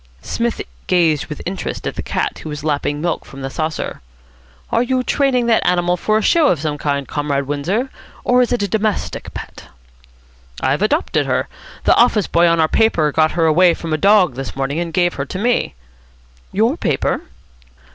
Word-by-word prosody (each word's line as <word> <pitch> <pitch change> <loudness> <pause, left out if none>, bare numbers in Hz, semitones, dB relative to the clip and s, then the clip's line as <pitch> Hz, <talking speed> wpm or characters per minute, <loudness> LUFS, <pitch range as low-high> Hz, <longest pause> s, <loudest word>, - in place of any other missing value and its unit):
Psmith 235 0 -2 0.3
gazed 165 -5 +2
with 150 -2 -7
interest 185 +2 -4
at - - -2
the - - -5
cat, - - -1
which - - -12
was 150 -2 -6
lapping 145 -1 -1
milk 170 0 -1
from 135 0 -10
the 135 - -4
saucer. 155 +1 -3 0.7
"Are 230 - +3
you 255 +1 0
training 260 -3 +1
that 230 -1 +3
animal 175 0 +2
for 215 +4 +1
a 220 - -1
show 325 - +4
of 170 - +2
some 150 -1 -3
kind, 140 -2 -1
Comrade 145 -2 -1
Windsor, 175 - -2 0.3
or 250 0 +4
is 245 - +1
it 245 -4 +1
a - - 0
domestic 205 - -2
pet?" - - -8 0.9
"I've 135 +6 0
adopted 290 - +1
her. - - 0 0.4
The - - +4
office 230 -4 +4
boy 170 +1 +3
on 170 0 +2
our 160 - +4
paper 160 -7 +2
got 155 +1 +2
her 165 -2 +2
away 170 +2 +5
from 165 -2 -5
a - - +2
dog 195 -6 +4
this 135 +1 -6
morning, 135 +3 -2
and 170 -1 -3
gave 175 0 +2
her - - -2
to 185 - -6
me." 235 - 0 0.8
"Your 230 - +1
paper?" - - 0
175 Hz, 190 wpm, -18 LUFS, 150-220 Hz, 0.9 s, away